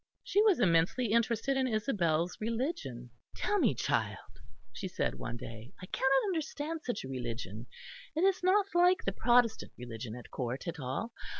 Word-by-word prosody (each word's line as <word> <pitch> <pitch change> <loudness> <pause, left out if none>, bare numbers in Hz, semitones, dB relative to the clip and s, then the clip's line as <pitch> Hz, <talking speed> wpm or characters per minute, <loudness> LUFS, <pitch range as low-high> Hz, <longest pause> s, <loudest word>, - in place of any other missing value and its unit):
She 410 - +3
was 420 - +4
immensely 185 +5 +3
interested 235 +3 +2
in 260 -1 +2
Isabel's 180 - +1
religion. 225 - -3 0.2
"Tell 415 -1 +1
me, - - +3
child," - - 0 0.6
she - - -4
said 180 - -1
one 120 0 -4
day, 115 +1 -9
"I 185 - -7
cannot 265 +7 +2
understand 320 -3 -2
such 245 -4 -3
a - - -6
religion. 120 -4 -5 0.5
It 325 - +1
is 385 -1 +3
not 380 +3 +4
like 355 +1 +4
the 195 - +1
Protestant 240 +2 +2
religion 115 -2 -6
at 125 - -11
Court 130 +4 -3
at 170 -1 -4
all. 135 - -3
220 Hz, 165 wpm, -32 LUFS, -, 0.6 s, was